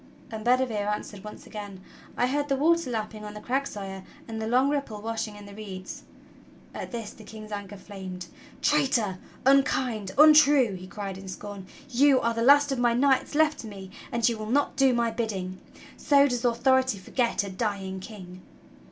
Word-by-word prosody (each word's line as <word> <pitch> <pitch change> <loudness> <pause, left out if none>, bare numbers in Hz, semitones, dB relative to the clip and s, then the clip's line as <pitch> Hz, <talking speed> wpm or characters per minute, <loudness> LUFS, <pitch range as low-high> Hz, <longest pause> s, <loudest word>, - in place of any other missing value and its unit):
And 220 -1 -6
Bedivere 240 -4 +1
answered 210 -1 -4
once 210 - -10
again: 205 -3 -8 0.4
"I - - +3
heard 290 +3 -1
the 275 - +2
water 335 +2 +2
lapping 215 -2 -4
on 210 0 -8
the - - -6
crags. 265 +5 -1
Sire, 195 -2 -7 0.3
and 220 -1 -5
the 220 - -2
long 255 +4 +3
ripple 280 -7 -2
washing 225 0 -4
in 205 0 -11
the 200 - -11
reeds." 195 -3 -8 0.7
At - - -6
this 230 -4 -5
the 220 - -14
King's 215 0 -10
anger 205 -1 -6
flamed. 185 -2 -8 0.4
"Traitor, 260 -10 +2 0.3
unkind, 255 -7 +2
untrue!" 295 -6 +7
he 185 0 -8
cried 195 -1 -6
in 195 - -10
scorn, 195 0 -8 0.2
"you 270 +1 +4
are 230 -1 0
the 230 - -2
last 285 +3 +6
of 270 - -1
my 240 -1 +3
knights 270 +2 +2
left 310 0 +3
to 225 - -7
me 195 -2 -9 0.2
and 235 -1 +2
you 230 -2 -1
will 215 0 -5
not 285 +4 +1
do 270 -1 +4
my 235 -1 +1
bidding. 195 -5 -3 0.4
So 285 -1 +4
does 245 -2 -2
authority 260 0 +2
forget 230 +4 -1
a 200 - -6
dying 190 -2 -3
king!" 185 -3 -10
225 Hz, 185 wpm, -27 LUFS, 205-260 Hz, 0.7 s, untrue